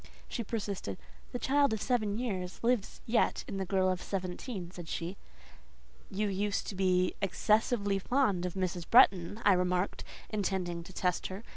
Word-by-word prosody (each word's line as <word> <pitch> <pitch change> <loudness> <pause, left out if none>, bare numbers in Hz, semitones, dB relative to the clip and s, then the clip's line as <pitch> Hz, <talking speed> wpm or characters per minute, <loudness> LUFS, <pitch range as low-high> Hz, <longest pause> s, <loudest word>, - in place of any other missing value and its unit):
She 235 - -3
persisted. 200 - -4 0.3
"The - - -2
child 280 -1 +3
of 220 - -1
seven 215 -5 0
years 190 -7 -3
lives 235 -3 0
yet 230 +1 +2
in 195 - -4
the 190 -1 -2
girl 190 0 +2
of 185 -1 0
seventeen," 185 0 -4
said 175 -3 -9
she. 175 +3 -3 0.9
"You 210 +2 -1
used 200 +1 -1
to 200 - -5
be 185 -1 +2
excessively 205 +1 +2
fond 200 -6 +1
of 180 - -7
Mrs. 180 -2 -2
Bretton," 205 -5 +5
I 200 - +7
remarked, 180 +1 0 0.3
intending 190 -5 -1
to - - -11
test 180 -1 0
her. 190 +3 -7
195 Hz, 160 wpm, -31 LUFS, 180-215 Hz, 0.9 s, I